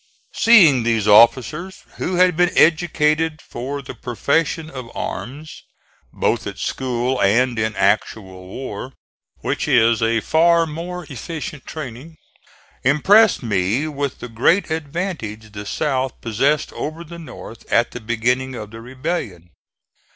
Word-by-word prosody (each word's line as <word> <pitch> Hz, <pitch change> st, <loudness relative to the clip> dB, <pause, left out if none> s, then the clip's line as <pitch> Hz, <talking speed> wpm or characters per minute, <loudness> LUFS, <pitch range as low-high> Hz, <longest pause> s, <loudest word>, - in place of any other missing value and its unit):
Seeing 180 Hz, -, +6 dB
these 115 Hz, -2 st, 0 dB
officers 125 Hz, -, +4 dB
who 185 Hz, -, -2 dB
had 180 Hz, -1 st, +4 dB
been 175 Hz, +1 st, +3 dB
educated 155 Hz, -1 st, +2 dB
for 140 Hz, +2 st, -6 dB
the -, -, -8 dB
profession 140 Hz, +7 st, -1 dB
of 130 Hz, -6 st, -8 dB
arms, 150 Hz, +5 st, -6 dB, 0.5 s
both -, -, -1 dB
at -, -, -6 dB
school 125 Hz, 0 st, -2 dB
and 120 Hz, +4 st, +2 dB
in 110 Hz, -1 st, -1 dB
actual 95 Hz, -2 st, -1 dB
war, 130 Hz, +3 st, -7 dB, 0.5 s
which -, -, -2 dB
is 115 Hz, -4 st, +4 dB
a 115 Hz, 0 st, +2 dB
far 165 Hz, +7 st, +3 dB
more 170 Hz, +3 st, -6 dB
efficient 150 Hz, +1 st, -7 dB
training, 150 Hz, +1 st, -8 dB, 0.7 s
impressed 195 Hz, -, +4 dB
me 105 Hz, +6 st, 0 dB
with 140 Hz, -3 st, -4 dB
the -, -, -5 dB
great 140 Hz, -, +1 dB
advantage 145 Hz, -, -4 dB
the 105 Hz, 0 st, -8 dB
South 130 Hz, -2 st, -2 dB
possessed 135 Hz, +7 st, 0 dB
over 155 Hz, +3 st, -5 dB
the 170 Hz, +1 st, -10 dB
North 125 Hz, -6 st, -11 dB
at 120 Hz, 0 st, +3 dB
the 125 Hz, -, -8 dB
beginning 125 Hz, +4 st, -1 dB
of 105 Hz, -3 st, -8 dB
the 115 Hz, 0 st, -10 dB
rebellion. 125 Hz, -, -5 dB
130 Hz, 130 wpm, -20 LUFS, 115-160 Hz, 0.7 s, Seeing